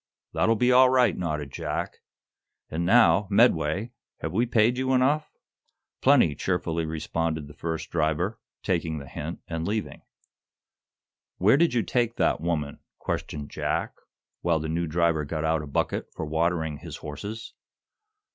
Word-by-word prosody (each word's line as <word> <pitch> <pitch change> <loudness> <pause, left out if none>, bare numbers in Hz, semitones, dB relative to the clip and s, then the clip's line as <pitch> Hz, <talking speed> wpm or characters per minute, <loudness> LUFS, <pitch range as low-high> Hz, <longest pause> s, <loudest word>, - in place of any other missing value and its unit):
"That'll 115 - +3
be 125 +3 +3
all 130 +1 +7
right," 130 -1 +3
nodded 75 -5 -3
Jack. - - -4 0.7
"And 85 +2 -1
now, 110 -2 +5
Medway, 100 -1 +3 0.3
have - - -3
we 115 +6 +1
paid 115 +1 +3
you 130 0 +1
enough?" 145 +4 +2 0.7
"Plenty," 75 - +5
cheerfully 85 0 -1
responded 80 -1 -2
the 75 - -12
first 80 +1 -5
driver, 80 +7 0 0.2
taking 85 -4 -1
the 70 -2 -8
hint 75 +5 -6
and 80 0 -3
leaving. 105 0 -3 1.4
"Where 105 +7 +5
did 165 -3 +3
you 115 - +2
take 120 -2 0
that - - +1
woman?" 80 -4 -2 0.2
questioned 75 -1 -4
Jack, - - -2 0.5
while 85 -2 +2
the 80 - -4
new 85 +2 -1
driver 85 -1 +1
got 75 +1 -3
out 80 0 +1
a 75 - -8
bucket 70 - -1
for 80 - -4
watering 80 0 0
his - - -8
horses. 100 +10 -7
85 Hz, 145 wpm, -26 LUFS, 80-110 Hz, 1.4 s, all